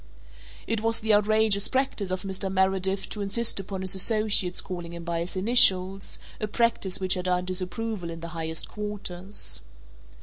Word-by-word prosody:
It 225 -1 -2
was 225 0 +2
the 220 0 +2
outrageous 210 -1 +3
practice 260 -7 -1
of 185 0 -3
Mr. 190 0 -3
Meredith 190 0 0
to 210 - -5
insist 205 +2 +1
upon 195 0 -5
his 190 0 +1
associates 200 -2 +2
calling 175 -2 -6
him 170 0 -7
by 170 -1 -2
his 170 +3 -5
initials, 195 -2 +4 0.2
a 215 - -2
practice 210 -4 0
which 185 -1 +2
had 180 -1 -2
earnt 180 0 0
disapproval 185 +1 -4
in 165 0 -7
the 170 - -6
highest 160 -1 -3
quarters. 200 - -4
190 Hz, 165 wpm, -26 LUFS, 180-210 Hz, 0.2 s, initials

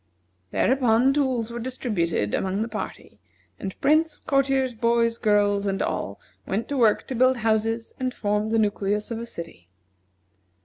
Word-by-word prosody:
Thereupon 255 - +3
tools 255 -5 0
were 235 - -5
distributed 210 - -1
among 195 +3 0
the - - -4
party, 215 -2 -7 0.4
and 190 -1 -6
Prince, 310 +2 +3
courtiers, 270 -2 +1
boys, 230 0 +1
girls, 205 -1 +2
and 195 0 -1
all - - -3 0.3
went 210 +4 -2
to 285 - -2
work 225 -4 +3
to - - -5
build 255 +1 +3
houses 225 0 0
and 255 -1 -1
form 210 -2 -1
the 225 +1 +1
nucleus 210 0 0
of 230 - -3
a 235 - -6
city. 165 - -8
225 Hz, 150 wpm, -25 LUFS, 205-255 Hz, 0.4 s, Thereupon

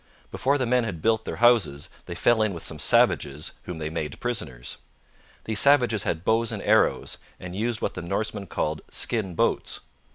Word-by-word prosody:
Before 140 +2 +1
the 130 - 0
men 125 +1 +2
had 100 -8 -4
built 110 +3 +1
their - - -4
houses 110 -12 +3 0.2
they - - -5
fell 120 -2 +3
in 105 -4 +1
with 85 - -8
some 75 - -6
savages, 75 +1 +2
whom 90 - -5
they 80 -1 -4
made 75 -3 -4
prisoners. 70 - -4 0.7
These 110 -1 0
savages 125 -8 +4
had 80 +2 -2
bows 115 0 +2
and - - -5
arrows, - - +2 0.2
and 90 0 -7
used 115 +3 -1
what - - -1
the 90 - -5
Norsemen 100 +3 -3
called 75 -2 -2
'skin 105 -7 -1
boats.' - - 0
105 Hz, 185 wpm, -25 LUFS, 80-115 Hz, 0.7 s, savages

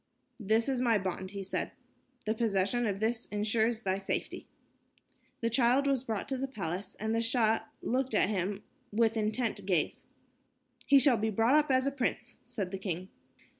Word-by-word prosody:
"This 220 +2 +2
is 260 -2 0
my 235 -3 +4
bond," 190 -1 -3
he 200 0 -6
said. 190 - -3 0.5
"The 215 - +1
possession 225 +1 +1
of 195 -1 -2
this 225 +2 -1
ensures 220 +2 0
thy 190 0 0
safety." 195 - -3 0.9
The 230 - +1
child 250 +3 +3
was 270 -3 +1
brought 220 -5 -3
to 265 -2 -2
the 270 - -1
palace, 195 -6 -4
and 220 +1 -1
the 230 - +1
Shah 225 -2 +2 0.2
looked 255 -1 0
at 205 - +4
him 200 0 -2 0.3
with 225 +1 +2
intent 215 -1 -1
gaze. 175 -6 0 0.8
"He 280 - +7
shall 265 -2 +5
be 220 +1 0
brought 225 +5 +2
up 300 -1 +4
as 260 0 +3
a 275 - +1
prince," 245 -2 -3
said 220 -7 -4
the 195 - -4
king. 185 -1 -4
225 Hz, 175 wpm, -31 LUFS, 200-245 Hz, 0.9 s, He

